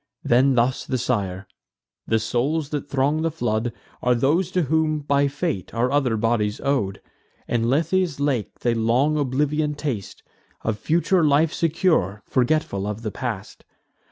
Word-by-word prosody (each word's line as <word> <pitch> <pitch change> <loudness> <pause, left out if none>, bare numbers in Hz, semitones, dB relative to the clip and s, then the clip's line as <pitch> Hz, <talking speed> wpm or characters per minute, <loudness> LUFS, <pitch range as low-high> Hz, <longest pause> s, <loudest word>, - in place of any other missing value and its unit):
Then 130 +2 +4
thus 125 +2 +1
the 130 - 0
sire: 100 -6 -2 0.6
"The 110 - +3
souls 140 +7 -1
that 145 -1 -4
throng 140 +3 +1
the 165 - +1
flood 120 -6 -1 0.3
Are 125 0 +3
those 155 +9 +2
to 180 -1 +1
whom, 155 +1 +1
by 140 0 +2
fate, 140 - -3
are 120 +2 +1
other 135 -6 +2
bodies 105 -2 0
ow'd: 115 -9 0 0.5
In 115 -1 0
Lethe's 165 +2 +1
lake 140 -6 -1
they 120 - +2
long 120 +7 +2
oblivion 150 +2 0
taste, 115 -11 -5 0.4
Of 110 -2 -1
future 170 - +2
life 150 +2 +3
secure, 160 - +1
forgetful 125 -7 0
of 105 +2 -5
the 110 - -3
past. 115 -6 -5
135 Hz, 150 wpm, -23 LUFS, 115-150 Hz, 0.6 s, Then